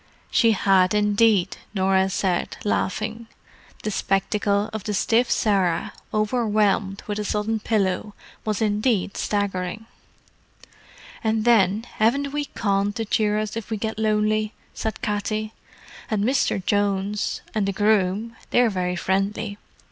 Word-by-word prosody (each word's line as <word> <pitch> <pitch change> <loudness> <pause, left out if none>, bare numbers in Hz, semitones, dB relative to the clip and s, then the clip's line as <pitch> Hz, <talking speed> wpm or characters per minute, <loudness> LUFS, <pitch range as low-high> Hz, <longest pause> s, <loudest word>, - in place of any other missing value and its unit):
"She 230 -2 +4
had, 190 -1 +3
indeed," 210 -2 +3 0.2
Norah 190 0 +2
said, 185 -2 -1
laughing. 215 +3 -2 0.6
The 215 - -1
spectacle 200 +1 0
of 220 -3 -4
the 210 - -1
stiff 235 +4 +2
Sarah, 195 -8 +1 0.2
overwhelmed 215 -3 +1
with 210 0 -3
a - - -1
sudden 210 +2 -1
pillow, 205 -1 -1 0.3
was 215 0 -1
indeed 210 -1 +1
staggering. 200 0 -2 1.4
"And 220 0 +1
then, 215 -3 +4
haven't 275 +6 +2
we 295 0 -1
Con 200 -4 0
to 225 +2 -3
cheer 210 0 +1
us 215 0 -2
up 225 - -5
if 225 - -6
we 220 - -2
get 220 +1 -3
lonely?" 215 0 +1 0.2
said 220 - -4
Katty. 215 +1 -2 0.6
"And 210 -3 0
Misther 260 -3 +2
Jones 200 +1 0
and 210 -3 0
the - - +1
groom—they're 215 +4 +1
very 180 -2 -1
friendly. 195 +3 -1
210 Hz, 130 wpm, -23 LUFS, 195-220 Hz, 1.4 s, She